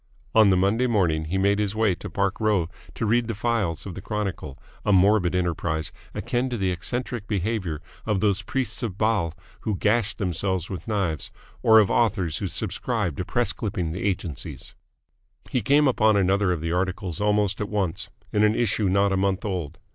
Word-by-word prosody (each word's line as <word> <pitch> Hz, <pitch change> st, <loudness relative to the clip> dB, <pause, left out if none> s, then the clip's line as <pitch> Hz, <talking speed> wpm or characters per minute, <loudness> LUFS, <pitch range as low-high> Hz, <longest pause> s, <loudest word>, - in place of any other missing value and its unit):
On 110 Hz, -2 st, +6 dB
the 95 Hz, -, +4 dB
Monday 105 Hz, +7 st, +2 dB
morning 85 Hz, -9 st, +1 dB
he 90 Hz, +5 st, -2 dB
made 100 Hz, +2 st, +2 dB
his 105 Hz, 0 st, -1 dB
way 110 Hz, -3 st, +3 dB
to -, -, -7 dB
Park 100 Hz, -1 st, -1 dB
Row 105 Hz, -6 st, +2 dB, 0.3 s
to -, -, -2 dB
read 115 Hz, +2 st, +2 dB
the 115 Hz, -, -3 dB
files 105 Hz, -6 st, -1 dB
of 100 Hz, -, -6 dB
the 95 Hz, -, -7 dB
Chronicle 100 Hz, -9 st, -4 dB, 0.3 s
a -, -, +1 dB
morbid 95 Hz, -2 st, +4 dB
enterprise, 85 Hz, -3 st, -1 dB, 0.2 s
akin 120 Hz, +2 st, -1 dB
to 120 Hz, -, -2 dB
the 95 Hz, -3 st, 0 dB
eccentric 120 Hz, +4 st, -4 dB
behaviour 95 Hz, -6 st, -2 dB, 0.2 s
of 105 Hz, -3 st, 0 dB
those 100 Hz, -1 st, +2 dB
priests 120 Hz, +2 st, -3 dB
of 105 Hz, -6 st, -3 dB
Baal 100 Hz, -7 st, +1 dB, 0.2 s
who 110 Hz, -, -2 dB
gashed 110 Hz, +1 st, +1 dB
themselves 95 Hz, -1 st, -1 dB
with 95 Hz, -, -6 dB
knives 95 Hz, -9 st, -1 dB, 0.3 s
or 110 Hz, 0 st, +6 dB
of 105 Hz, -3 st, +5 dB
authors 95 Hz, -8 st, +1 dB
who -, -, -2 dB
subscribe 105 Hz, -, -2 dB
to -, -, -1 dB
press 120 Hz, -2 st, +1 dB
clipping 90 Hz, -7 st, -3 dB
agencies. 90 Hz, -6 st, -3 dB, 0.8 s
He 125 Hz, -, +1 dB
came 145 Hz, +3 st, +4 dB
upon 110 Hz, -4 st, +4 dB
another 100 Hz, 0 st, +2 dB
of 85 Hz, -3 st, -1 dB
the 85 Hz, 0 st, -2 dB
articles 90 Hz, 0 st, -2 dB
almost 105 Hz, -1 st, +1 dB
at 105 Hz, -, -2 dB
once, 95 Hz, -2 st, -2 dB, 0.2 s
in 105 Hz, -, +3 dB
an 105 Hz, +1 st, +4 dB
issue 105 Hz, -4 st, +1 dB
not 100 Hz, +1 st, +3 dB
a -, -, +1 dB
month 95 Hz, +1 st, 0 dB
old. 90 Hz, -5 st, -3 dB
100 Hz, 185 wpm, -25 LUFS, 90-110 Hz, 0.8 s, On